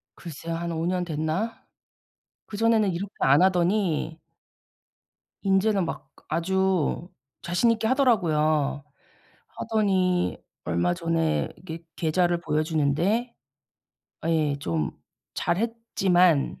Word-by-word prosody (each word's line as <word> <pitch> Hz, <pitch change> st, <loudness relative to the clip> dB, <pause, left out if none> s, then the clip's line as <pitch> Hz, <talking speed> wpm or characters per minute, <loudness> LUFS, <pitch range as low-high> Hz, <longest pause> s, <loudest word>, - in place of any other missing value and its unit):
글쎄요. 165 Hz, 0 st, -6 dB
한 170 Hz, +1 st, -3 dB
5년 175 Hz, +2 st, -1 dB
됐나? 160 Hz, +7 st, -3 dB, 0.8 s
그전에는 220 Hz, -1 st, +2 dB
이렇게 190 Hz, +4 st, -5 dB
안 140 Hz, +4 st, +5 dB
하더니 180 Hz, -3 st, +1 dB, 1.2 s
인제는 195 Hz, 0 st, +2 dB
막 135 Hz, -4 st, -7 dB, 0.2 s
아주 180 Hz, 0 st, 0 dB, 0.3 s
자신있게 220 Hz, +6 st, +1 dB
하더라고요. 155 Hz, -, +2 dB, 0.6 s
하더니 190 Hz, -5 st, 0 dB, 0.3 s
얼마 85 Hz, -, +1 dB
전에 165 Hz, -2 st, 0 dB
이게 165 Hz, -2 st, -8 dB
계좌를 175 Hz, +1 st, +1 dB
보여주는데 160 Hz, -, 0 dB, 0.9 s
아 165 Hz, -, -4 dB
예 155 Hz, -3 st, +1 dB
좀 80 Hz, -, -2 dB, 0.4 s
잘했지만 185 Hz, -6 st, +1 dB
175 Hz, 205 characters per minute, -25 LUFS, 160-195 Hz, 1.2 s, 안